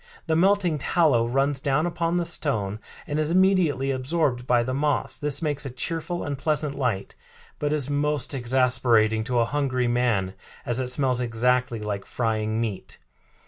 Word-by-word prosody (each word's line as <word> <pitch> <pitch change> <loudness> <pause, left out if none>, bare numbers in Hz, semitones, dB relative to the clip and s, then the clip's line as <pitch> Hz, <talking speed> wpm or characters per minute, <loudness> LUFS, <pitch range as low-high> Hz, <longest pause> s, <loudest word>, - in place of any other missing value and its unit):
The 160 - 0
melting 180 -2 +2
tallow 140 -7 +2
runs 135 +3 0
down 140 +2 0
upon 170 0 -1
the 175 - 0
stone 110 -11 -2 0.3
and 150 0 -2
is 155 0 0
immediately 175 -7 +2
absorbed 130 -2 -1
by 120 -1 +3
the 130 +2 -3
moss. 145 +2 0
This 145 0 -1
makes 150 -2 -1
a 135 - -2
cheerful 165 +8 -3
and 140 -2 -4
pleasant 150 -2 -1
light, 125 -8 -2 0.5
but 145 0 -1
is 150 -4 -1
most 145 -1 0
exasperating 120 -3 +2
to 125 -1 -1
a 115 - +3
hungry 130 -1 -1
man 120 -6 0 0.3
as 120 +1 +1
it 130 - -1
smells 125 -1 +2
exactly 125 0 0
like 100 -2 -4
frying 110 -2 -1
meat. 110 -5 -4
135 Hz, 165 wpm, -24 LUFS, 120-150 Hz, 0.5 s, by